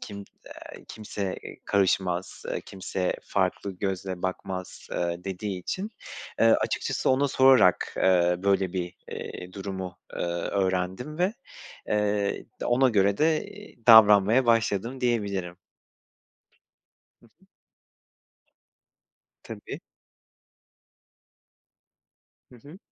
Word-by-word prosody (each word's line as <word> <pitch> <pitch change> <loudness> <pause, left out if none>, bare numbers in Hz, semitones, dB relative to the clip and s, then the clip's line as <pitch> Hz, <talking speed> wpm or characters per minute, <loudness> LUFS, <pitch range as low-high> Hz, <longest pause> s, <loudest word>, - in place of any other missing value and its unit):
kim, 100 -1 -8
eee, 100 - -15 0.4
kimse, 100 -3 -5
eee, - - -9
karışmaz, 95 -2 0
eee - - -3
kimse 95 -1 -3
farklı 100 - -1
gözle 95 -2 -3
bakmaz. 95 0 -5
eee, 85 - -1 0.2
dediği 95 0 -4
için, 195 - -4 0.5
eee, - - +5
açıkçası 115 - +1
ona 135 +2 +3
sorarak, 130 -8 +4
eee, 90 -1 +3
böyle, 95 -2 +1
bir, 90 -1 -3 0.2
eee, 90 0 -7
durumu, 95 -2 -6 0.2
eee, - - -6
öğrendim 95 - -2
ve, 185 +5 +1 0.6
eee, 105 -1 0 0.2
d - - -2
ona 130 +2 +4
göre 100 -3 +2
de, 155 0 +2
eee, 210 +1 -13
davranmaya 110 +2 +7
başladım 115 +2 +1
diyebilirim. 100 -6 -3 1.9
Hı - - -24
hı. - - -41 2.0
Tabii. - - -8 2.7
Hı 125 - -15
hı. 145 +9 -14
100 Hz, 100 wpm, -26 LUFS, 95-115 Hz, 2.7 s, davranmaya